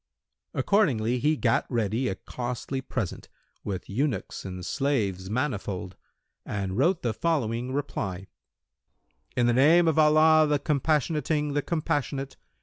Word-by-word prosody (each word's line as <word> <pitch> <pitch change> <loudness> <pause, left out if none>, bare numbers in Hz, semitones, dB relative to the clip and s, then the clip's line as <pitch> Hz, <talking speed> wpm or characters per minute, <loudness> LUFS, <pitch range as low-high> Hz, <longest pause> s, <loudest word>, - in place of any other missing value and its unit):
Accordingly 125 - +2
he 150 +4 +2
gat 115 -4 +1
ready 115 +1 0
a 95 - -1
costly 125 +4 -5
present, 125 -7 -4 0.3
with 95 -3 -4
eunuchs 130 +5 -2
and 90 -2 -6
slaves 100 -10 -1
manifold, 100 -7 -3 0.5
and 95 -2 -3
wrote 165 - +2
the 120 -3 0
following 125 -4 -1
reply, 110 -10 -3 1.1
"In 120 - +3
the 120 - +3
name 160 +7 +5
of 160 -1 +3
Allah 155 0 +6
the 150 0 +2
Compassionating, 150 +1 0
the 145 - +1
Compassionate! 140 -4 -2
130 Hz, 125 wpm, -27 LUFS, 110-150 Hz, 1.1 s, Allah